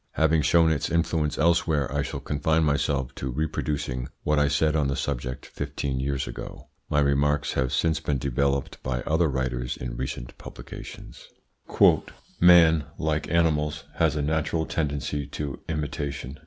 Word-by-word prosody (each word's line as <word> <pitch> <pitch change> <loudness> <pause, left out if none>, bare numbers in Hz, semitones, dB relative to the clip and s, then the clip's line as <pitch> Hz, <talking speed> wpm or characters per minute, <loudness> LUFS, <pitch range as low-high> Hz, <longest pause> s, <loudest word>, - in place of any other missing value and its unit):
Having 80 0 +3
shown 80 +1 +4
its 75 -2 -1
influence 80 -3 0
elsewhere, 80 -4 +2
I 70 - +2
shall - - -4
confine 80 +2 +1
myself 70 -3 0
to 65 - -4
reproducing 70 -3 -2 0.2
what 75 0 +2
I 75 - +3
said 75 +2 +2
on 75 -3 +2
the 70 - -1
subject 65 +1 -3
fifteen 65 -2 -4
years 70 0 -2
ago. - - -8 0.2
My 75 - +2
remarks 70 +1 +1
have 65 -1 0
since 80 -1 +1
been 75 -3 -1
developed 70 +1 -1
by 65 -1 -2
other 80 +5 +2
writers 65 -2 -2
in - - -5
recent - - -5
publications. - - -10 1.1
"Man, 85 -3 +6
like 75 -1 -1
animals, 75 -3 +1
has 80 -2 +2
a 75 - -1
natural 80 +1 0
tendency 70 -2 -2
to 70 -2 -5
imitation. 75 -3 -4
75 Hz, 150 wpm, -26 LUFS, 70-80 Hz, 1.1 s, Man